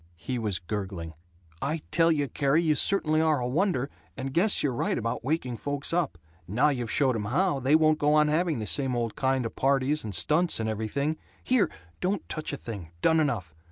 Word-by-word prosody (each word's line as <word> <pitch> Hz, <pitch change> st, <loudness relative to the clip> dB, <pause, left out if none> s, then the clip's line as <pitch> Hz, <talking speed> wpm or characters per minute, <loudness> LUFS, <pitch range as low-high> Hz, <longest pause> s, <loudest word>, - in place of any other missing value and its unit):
He 120 Hz, +9 st, -4 dB
was 105 Hz, -5 st, -1 dB
gurgling, 95 Hz, -3 st, -5 dB, 0.5 s
"I 155 Hz, +3 st, -2 dB
tell 165 Hz, 0 st, +4 dB
you, 145 Hz, -3 st, +1 dB
Carrie, 140 Hz, +6 st, +1 dB
you 155 Hz, -2 st, +3 dB
certainly 155 Hz, -2 st, +3 dB
are 155 Hz, -3 st, +2 dB
a 120 Hz, -, -2 dB
wonder, 145 Hz, -1 st, +1 dB, 0.3 s
and 135 Hz, 0 st, -4 dB
guess 195 Hz, +7 st, +3 dB
you're 140 Hz, -4 st, +1 dB
right 120 Hz, -, -1 dB
about 115 Hz, 0 st, -3 dB
waking 130 Hz, -4 st, -1 dB
folks 145 Hz, +4 st, -4 dB
up. 170 Hz, -, 0 dB, 0.3 s
Now 125 Hz, +11 st, +3 dB
you've 125 Hz, -5 st, -2 dB
showed 130 Hz, -1 st, +2 dB
'em 105 Hz, -2 st, -2 dB
how, 155 Hz, -, +1 dB
they 135 Hz, +4 st, +3 dB
won't 155 Hz, -1 st, +4 dB
go 150 Hz, +1 st, +3 dB
on 150 Hz, 0 st, +5 dB
having 160 Hz, +1 st, +1 dB
the 110 Hz, -, -3 dB
same 130 Hz, +4 st, +1 dB
old 115 Hz, -2 st, -2 dB
kind 130 Hz, -2 st, 0 dB
of 115 Hz, -, -5 dB
parties 140 Hz, +2 st, +1 dB
and 105 Hz, -4 st, -3 dB
stunts 160 Hz, -, +2 dB
and 110 Hz, -, -1 dB
everything. 125 Hz, +8 st, -2 dB, 0.3 s
Here! 250 Hz, -4 st, +2 dB, 0.3 s
Don't 190 Hz, -1 st, -1 dB
touch 155 Hz, -, -4 dB
a 140 Hz, -, -4 dB
thing! 100 Hz, -11 st, -7 dB
Done 160 Hz, 0 st, +4 dB
enough. 115 Hz, -, -1 dB
140 Hz, 205 wpm, -27 LUFS, 115-155 Hz, 0.5 s, on